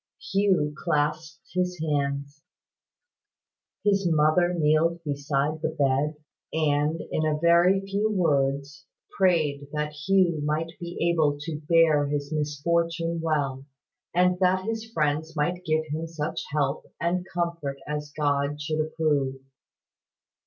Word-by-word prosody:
Hugh 190 -7 +2
clasped 155 +1 -2
his 180 -1 -1
hands. 140 -1 -2 1.4
His 200 -2 +2
mother 155 +3 +3
kneeled 165 +1 +2
beside 145 +1 -1
the 160 - 0
bed, 145 0 +1 0.4
and, 155 0 +1
in 155 - 0
a 155 -1 +1
very 170 +4 +4
few 200 +2 -1
words, 145 -5 0 0.3
prayed 155 -7 +2
that 150 0 -1
Hugh 170 +1 +2
might 155 +2 -1
be 175 0 -7
able 150 -4 +2
to 155 0 -5
bear 160 -4 +5
his 145 0 -3
misfortune 165 +3 0
well, 140 -4 -1 0.4
and 180 +1 +2
that 185 0 +2
his 225 0 -4
friends 155 -2 -1
might 175 +4 -1
give 155 -1 +1
him 160 +3 -3
such 155 -2 -4
help 140 -2 -1
and 175 +1 0
comfort 170 -6 -2
as 150 0 -4
God 145 0 0
should 155 +1 -1
approve. 150 -4 0
155 Hz, 125 wpm, -26 LUFS, 145-170 Hz, 1.4 s, bear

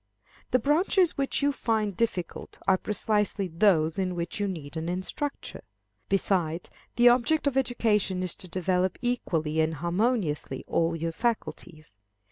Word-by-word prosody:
The - - +4
branches 330 - +2
which 275 0 -1
you 285 - +4
find 220 -7 -1
difficult, 185 -6 -3
are 190 -1 +4
precisely 210 -1 0
those 165 -1 +2
in 185 -1 -1
which 170 +3 -4
you 205 - 0
need 155 -6 -6
an 160 +1 -3
instructor. 185 +11 -4 0.5
Besides, 180 -4 0 0.2
the 240 0 +7
object 250 +6 +2
of 280 -2 +1
education 210 -8 +1
is 180 - +1
to 185 - 0
develop 185 +1 0
equally 160 -11 -1
and 160 0 +1
harmoniously 170 - -1
all 165 0 0
your 165 0 -2
faculties. 165 - -4
190 Hz, 140 wpm, -27 LUFS, 165-235 Hz, 0.5 s, the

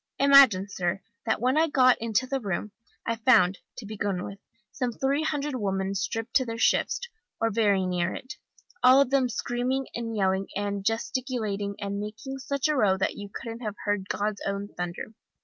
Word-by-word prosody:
Imagine, 275 -9 +6
sir, 190 -1 -2 0.2
that 220 - +1
when 255 +6 +2
I 325 - +4
got 255 -4 +5
into 230 +2 +1
the 270 +1 -2
room, 205 -2 -3 0.3
I 230 - -1
found, 195 -6 +4 0.2
to 235 - -7
begin 200 -3 -2
with, 200 0 -8 0.3
some 250 -2 -2
three 270 +5 0
hundred 295 -2 -2
women, 195 -4 -1
stripped 220 +3 -3
to 260 - 0
their 230 0 -4
shifts, 235 - +2 0.4
or 225 0 +1
very 200 -3 +2
near 180 -1 0
it, 260 - -7 0.5
all 255 +2 +7
of 275 -2 +3
them 265 -2 +3
screaming 250 +3 -1
and 230 -1 -4
yelling 190 0 +1
and 200 -1 -2
gesticulating, 225 -3 -2
and 200 -1 -4
making 215 +6 -6
such 280 +1 -1
a 305 - +1
row 200 -7 +3
that 190 - 0
you 205 0 -8
couldn't 230 0 -6
have 215 -4 -4
heard 205 -2 -1
God's 205 0 -2
own 200 +1 -3
thunder. 175 +4 -6
220 Hz, 185 wpm, -27 LUFS, 200-255 Hz, 0.5 s, all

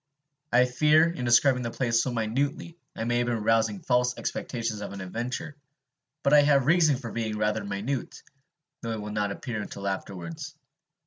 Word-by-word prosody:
I 125 +1 +5
fear, 150 +5 +4
in 130 -7 -5
describing 125 +2 +4
the 120 - -2
place 115 -1 +1
so 130 - -2
minutely, 135 +9 -2 0.2
I 115 - -3
may 120 +1 +1
have 120 - 0
been 115 -3 -1
rousing 110 -2 +2
false 125 0 +1
expectations 115 -4 -3
of 100 - -6
an 100 - -7
adventure; 120 +10 -4 0.7
but 140 - +3
I 150 - +8
have 140 -2 +4
a - - -7
reason 160 -2 +4
for 120 -3 -7
being 110 -2 -3
rather 105 0 0
minute, 100 +7 -4 0.6
though 115 -1 -3
it 110 - -4
will 105 0 -6
not 105 -1 -1
appear 110 +1 -4
until 100 -1 -6
afterwards. 90 -4 -5
120 Hz, 185 wpm, -27 LUFS, 105-130 Hz, 0.7 s, I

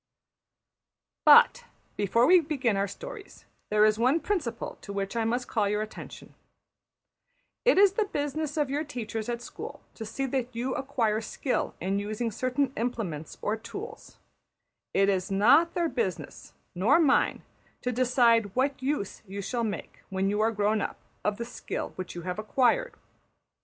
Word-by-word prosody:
But, - - +7 0.3
before 210 +4 +3
we 365 +4 +7
begin 275 -8 0
our 200 +1 +1
stories, 435 - -10 0.2
there 210 0 +5
is 215 0 +2
one 260 +7 +3
principle 300 - -3
to 200 - -8
which 200 +2 -3
I 230 -1 +1
must 245 +2 -1
call 210 -3 +1
your 210 +1 0
attention: 215 - -10 1.3
it - - +5
is 395 -1 +6
the 430 +1 +1
business 295 -3 -3
of 290 -3 +1
your 290 +2 0
teachers 225 -6 -5
at 240 0 -3
school - - -8
to 225 - -7
see 225 +5 -3
that 255 -2 -2
you 250 +3 -1
acquire 235 -6 0
skill 250 +4 -2
in 195 +3 -1
using 215 +3 -2
certain 255 +4 -1
implements 210 -10 -3
or 210 - +1
tools; 400 - -9 0.7
it 195 0 +3
is 190 -2 0
not 270 +13 +4
their 345 -1 +2
business 455 +8 -4 0.2
nor 210 - +4
mine 290 -4 +3 0.4
to 250 - 0
decide 235 -4 +3
what 265 +1 0
use 260 -7 -2
you 195 +1 -6
shall 235 +5 -2
make, 215 -3 -5
when 195 0 0
you 210 +1 0
are 220 - +3
grown 210 0 +1
up, - - -3 0.3
of 210 0 0
the 235 - -4
skill 245 - -5
which 185 -2 -7
you 175 - -6
have 180 +3 -4
acquired. 275 - +1
235 Hz, 160 wpm, -28 LUFS, 210-280 Hz, 1.3 s, But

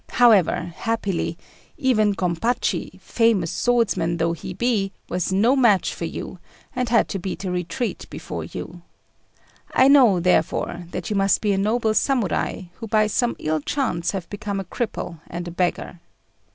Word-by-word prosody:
However, 180 -7 +4
happily, 200 -5 -2 0.4
even 215 -6 +2
Gompachi, 185 +7 -1
famous 225 -8 +1
swordsman 200 -9 +1
though 165 +1 +1
he 170 - -7
be, 220 -5 0 0.2
was 180 +1 -2
no 220 +8 +3
match 230 -8 +3
for 170 - -5
you, 180 +2 -6 0.4
and 250 -2 -1
had 230 0 +3
to 195 - -3
beat 190 +2 -5
a 185 - -2
retreat 180 +7 -3
before - - -6
you. - - -8 0.9
I 260 - +5
know, 255 -10 +6
therefore, 175 0 0
that - - -5
you - - 0
must 195 0 +3
be 210 -2 +1
a - - 0
noble 220 +2 +1
Samurai, 235 -7 0 0.2
who 225 - -6
by 215 0 +3
some 235 +3 0
ill 155 0 -1
chance 175 - -1
have 190 -4 -3
become 205 -1 -3
a - - -3
cripple 180 -5 -4
and 175 +1 -5
a - - -5
beggar. 175 0 -2
200 Hz, 160 wpm, -23 LUFS, 175-230 Hz, 0.9 s, know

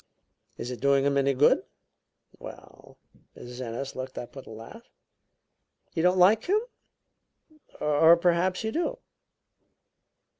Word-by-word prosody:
"Is 120 - -6
it 125 - -7
doing 140 0 +3
him 140 0 +1
any 140 0 +1
good?" 135 - +4 0.8
"Well - - -13 0.2
" - - -27
Mrs. 125 +1 -9
Ennis 125 +3 -6
looked 130 0 -7
up 120 - -8
with 135 - -10
a - - -11
laugh. 115 - -12 1.0
"You 165 - -1
don't 180 +2 +3
like 200 +5 +4
him? 405 +4 +2 1.2
Or 160 +3 +5
perhaps 180 +2 +1
you 220 - -2
do?" 350 - -2
145 Hz, 135 wpm, -26 LUFS, 130-185 Hz, 1.2 s, Or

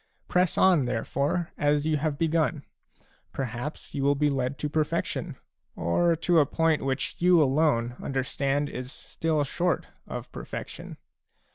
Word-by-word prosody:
Press 180 0 +2
on, 175 -8 +5
therefore, 140 +8 -1
as 145 0 +2
you 155 -1 +2
have 150 0 -1
begun; 160 -2 0 0.7
perhaps 130 +3 -5
you 140 - -2
will 140 +1 +3
be 145 +1 +2
led 135 0 -1
to 150 - -2
perfection, 150 0 -1 0.4
or 165 - +2
to 170 +1 +3
a 145 - +5
point 160 0 +1
which 135 0 -2
you 180 0 +5
alone 135 -5 +2
understand 135 +2 -1
is 125 -2 -6
still 155 -1 -1
short 175 +5 -1 0.2
of - - -6
perfection. - - -7
145 Hz, 140 wpm, -27 LUFS, 135-160 Hz, 0.7 s, on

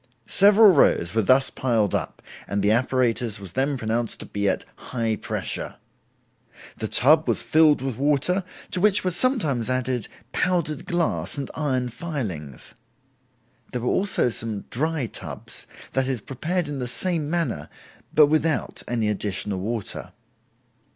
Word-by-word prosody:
Several 205 - +6
rows 95 - +3
were 110 - +2
thus 130 +6 +3
piled 115 -6 0
up, - - -3 0.2
and 100 0 -1
the 100 - +3
apparatus 120 -2 +1
was 95 -2 -9
then 135 +2 0
pronounced 115 0 -1
to - - -7
be 100 -1 -1
at - - -2
'high 115 -3 -2
pressure'. - - -4 1.0
The - - -3
tub 155 +5 +5
was - - 0
filled 155 -4 +4
with 130 -4 -3
water, 150 +7 +1 0.3
to 180 - 0
which 210 0 +5
were 185 - 0
sometimes 165 - +1
added 130 -2 -1 0.2
powdered 170 -3 0
glass 175 -5 -1
and 140 -2 -4
iron 130 -5 -1
filings. 105 - -6 1.0
There 125 - -3
were 120 - -1
also 190 -9 +2
some 110 -3 -3
dry 155 +1 -1
tubs, - - -7 0.2
that 135 -1 0
is, 130 -3 -1
prepared 160 - -3
in 145 -2 -4
the 125 - -3
same 160 +3 +1
manner, 150 - -2 0.4
but 150 - +6
without 155 +1 0
any 115 -3 -1
additional 100 -1 -2
water. 110 +1 -4
130 Hz, 145 wpm, -24 LUFS, 115-160 Hz, 1.0 s, Several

